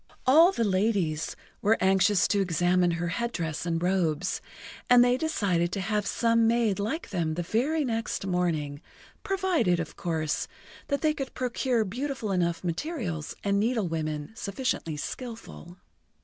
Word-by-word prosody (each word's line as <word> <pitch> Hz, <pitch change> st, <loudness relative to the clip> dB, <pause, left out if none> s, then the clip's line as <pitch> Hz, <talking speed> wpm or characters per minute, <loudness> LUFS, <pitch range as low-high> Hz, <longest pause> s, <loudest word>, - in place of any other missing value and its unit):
All 320 Hz, +8 st, +7 dB
the 235 Hz, -, -1 dB
ladies 190 Hz, -6 st, 0 dB, 0.3 s
were 215 Hz, +2 st, +3 dB
anxious 190 Hz, +1 st, +4 dB
to 200 Hz, -, +2 dB
examine 180 Hz, 0 st, +2 dB
her 175 Hz, 0 st, -2 dB
head 235 Hz, +7 st, -2 dB
dress 165 Hz, -3 st, -3 dB
and 165 Hz, 0 st, -1 dB
robes, 175 Hz, -5 st, 0 dB, 0.5 s
and 245 Hz, -1 st, +8 dB
they 245 Hz, 0 st, +3 dB
decided 200 Hz, -, 0 dB
to 200 Hz, -, -1 dB
have 210 Hz, +1 st, -1 dB
some 230 Hz, -1 st, +2 dB
made 230 Hz, -4 st, +2 dB
like 225 Hz, +10 st, -3 dB
them 165 Hz, -5 st, -1 dB
the 175 Hz, -, -2 dB
very 280 Hz, -, 0 dB
next 225 Hz, -4 st, -2 dB
morning, 160 Hz, -6 st, -1 dB, 0.4 s
provided, 370 Hz, -, +1 dB
of 165 Hz, -, -5 dB
course, 160 Hz, -3 st, -1 dB, 0.4 s
that 280 Hz, -, -1 dB
they 310 Hz, -1 st, +3 dB
could 275 Hz, -3 st, -6 dB
procure 250 Hz, -2 st, 0 dB
beautiful 250 Hz, +1 st, -3 dB
enough 170 Hz, -2 st, 0 dB
materials 175 Hz, -, -3 dB
and 200 Hz, 0 st, +2 dB
needlewomen 165 Hz, -10 st, -1 dB
sufficiently 200 Hz, -, -2 dB
skilful. 225 Hz, -, -7 dB
200 Hz, 145 wpm, -27 LUFS, 170-240 Hz, 0.5 s, and